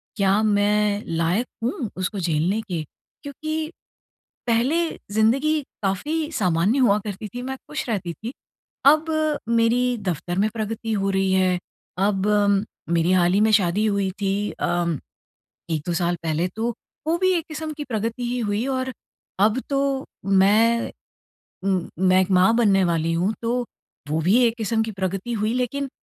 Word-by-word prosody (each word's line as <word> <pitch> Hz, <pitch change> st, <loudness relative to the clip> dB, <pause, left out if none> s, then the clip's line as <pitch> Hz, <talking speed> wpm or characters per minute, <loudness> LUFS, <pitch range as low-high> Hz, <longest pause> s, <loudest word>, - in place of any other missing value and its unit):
क्या 200 Hz, 0 st, +3 dB
मैं 210 Hz, 0 st, +2 dB
लायक 170 Hz, +8 st, 0 dB, 0.2 s
हूँ 235 Hz, -2 st, -2 dB
उसको 185 Hz, +2 st, -2 dB
झेलने 170 Hz, +4 st, 0 dB
के? 180 Hz, -7 st, -4 dB, 0.4 s
क्योंकि 310 Hz, +3 st, -4 dB, 0.8 s
पहले 235 Hz, +6 st, +2 dB, 0.4 s
ज़िंदगी 270 Hz, +9 st, +2 dB, 0.2 s
काफ़ी 300 Hz, -, -1 dB
सामान्य 190 Hz, -, +2 dB
हुआ 215 Hz, -6 st, +4 dB
करती 210 Hz, +1 st, -5 dB
थी 245 Hz, -, -3 dB
मैं 265 Hz, +1 st, -4 dB
खुश 300 Hz, -, -4 dB
रहती 180 Hz, -6 st, -2 dB
थी। 220 Hz, +7 st, -7 dB, 0.6 s
अब 310 Hz, +1 st, +2 dB, 0.4 s
मेरी 230 Hz, +1 st, +3 dB, 0.2 s
दफ़्तर 175 Hz, 0 st, -2 dB
में 210 Hz, +2 st, +3 dB
प्रगति 225 Hz, +1 st, -3 dB
हो 195 Hz, -1 st, 0 dB
रही 195 Hz, 0 st, +1 dB
है, 185 Hz, -1 st, +2 dB, 0.4 s
अब 195 Hz, +1 st, +1 dB, 0.6 s
मेरी 170 Hz, +1 st, +2 dB
हाल 180 Hz, -1 st, +3 dB
ही 200 Hz, -, +3 dB
में 220 Hz, 0 st, +4 dB
शादी 200 Hz, +1 st, +3 dB
हुई 200 Hz, -2 st, +1 dB
थी 195 Hz, -1 st, +1 dB, 0.2 s
अ, 175 Hz, 0 st, -1 dB, 0.9 s
1-2 160 Hz, +2 st, -1 dB
साल 175 Hz, +1 st, 0 dB
पहले 160 Hz, +3 st, 0 dB
तो 230 Hz, +2 st, -1 dB, 0.3 s
वो 330 Hz, -, +2 dB
भी 370 Hz, +1 st, +3 dB
एक 325 Hz, -, -5 dB
क़िस्म 310 Hz, 0 st, -5 dB
की 295 Hz, -, -3 dB
प्रगति 230 Hz, 0 st, -3 dB
ही 250 Hz, -, -1 dB
हुई 210 Hz, +2 st, -1 dB
और 260 Hz, 0 st, -2 dB, 0.5 s
अब 220 Hz, +4 st, 0 dB
तो 275 Hz, -1 st, 0 dB, 0.2 s
मैं 210 Hz, +4 st, +4 dB, 0.7 s
मैं 185 Hz, 0 st, +2 dB
एक 190 Hz, -, 0 dB
माँ 190 Hz, +5 st, +5 dB
बनने 195 Hz, -5 st, +4 dB
वाली 165 Hz, -1 st, +1 dB
हूँ 180 Hz, +5 st, +1 dB
तो, 240 Hz, +2 st, 0 dB, 0.4 s
वो 155 Hz, +2 st, 0 dB
भी 190 Hz, +9 st, +4 dB
एक 230 Hz, 0 st, 0 dB
क़िस्म 225 Hz, 0 st, 0 dB
की 220 Hz, -, -3 dB
प्रगति 190 Hz, +5 st, -2 dB
हुई। 215 Hz, 0 st, 0 dB
लेकिन 265 Hz, +3 st, -1 dB
210 Hz, 155 wpm, -23 LUFS, 185-240 Hz, 0.9 s, माँ